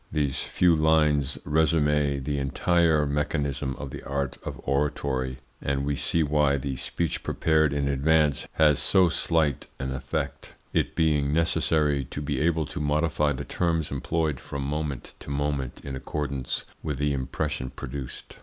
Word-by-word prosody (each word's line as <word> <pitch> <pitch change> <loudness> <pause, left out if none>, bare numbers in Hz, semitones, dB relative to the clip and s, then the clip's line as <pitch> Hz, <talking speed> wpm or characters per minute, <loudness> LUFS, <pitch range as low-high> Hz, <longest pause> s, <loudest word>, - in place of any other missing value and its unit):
These 70 -3 0
few 90 -2 +3
lines 75 -3 +3
resume 75 -2 +2
the 70 +1 -1
entire 80 +2 +2
mechanism 70 -2 -1
of 70 -2 -7
the - - -7
art 70 -1 -2
of - - -6
oratory, 70 -2 -1 0.2
and 70 0 -1
we 70 0 0
see 80 +3 +1
why 75 -1 +2
the 65 0 -3
speech 80 +4 -2
prepared 80 -2 +2
in 70 0 0
advance 75 +1 +2
has 75 -3 +4
so 95 -3 +4
slight 80 -4 +1
an 65 0 -3
effect, 70 +1 -4 0.2
it - - 0
being 75 -3 +2
necessary 75 -3 +2
to 70 - -6
be 70 -2 -2
able 80 -1 +2
to - - -6
modify 75 0 +1
the 65 - -4
terms 80 -3 0
employed 75 +1 -1
from 70 -1 -5
moment 70 -2 -3
to - - -9
moment 70 -2 -2
in 70 -1 -4
accordance 70 -1 -3 0.2
with 75 -4 -3
the 75 +1 +1
impression 70 0 -2
produced. 65 0 -7
75 Hz, 155 wpm, -26 LUFS, 70-80 Hz, 0.2 s, has